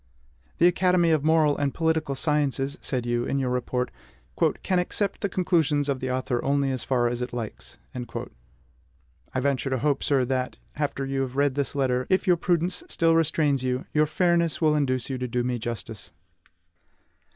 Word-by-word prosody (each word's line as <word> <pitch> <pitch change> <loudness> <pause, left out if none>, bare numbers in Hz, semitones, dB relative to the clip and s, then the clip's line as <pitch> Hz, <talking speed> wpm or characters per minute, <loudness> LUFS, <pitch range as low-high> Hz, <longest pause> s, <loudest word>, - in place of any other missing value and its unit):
"The 170 - +4
Academy 180 -1 +3
of 155 -3 +2
Moral 155 -2 +4
and 140 -1 -1
Political 160 -3 0
Sciences," 140 -2 0
said 125 -3 -1
you 120 0 0
in 140 - -1
your 130 -2 0
report, 125 0 -1 0.7
"can 185 -1 +2
accept 195 +2 -2
the 200 - 0
conclusions 160 -6 +1
of 140 -2 -1
the 130 - -3
author 125 -1 -1
only 140 0 +1
as 130 -3 -3
far 125 -2 +1
as 120 +1 -2
it 125 0 -4
likes." 115 -3 -6 0.2
I 65 - -9
venture 135 0 0
to 130 - 0
hope, 140 +2 0
sir, 135 -3 +2
that, 130 0 -2 0.2
after 145 -2 -2
you 135 0 -1
have 130 -1 -3
read 140 -1 +2
this 140 +1 -2
letter, 130 -2 0
if 190 - +2
your 180 -2 +4
prudence 175 - 0
still 165 - +2
restrains 155 -4 +2
you, 130 0 -1
your 155 0 +3
fairness 170 0 +1
will 155 -2 +3
induce 130 -4 0
you 130 -2 -3
to 125 - -2
do 125 +1 -1
me 125 -1 -1
justice. 110 -3 -6
135 Hz, 180 wpm, -26 LUFS, 125-155 Hz, 0.7 s, The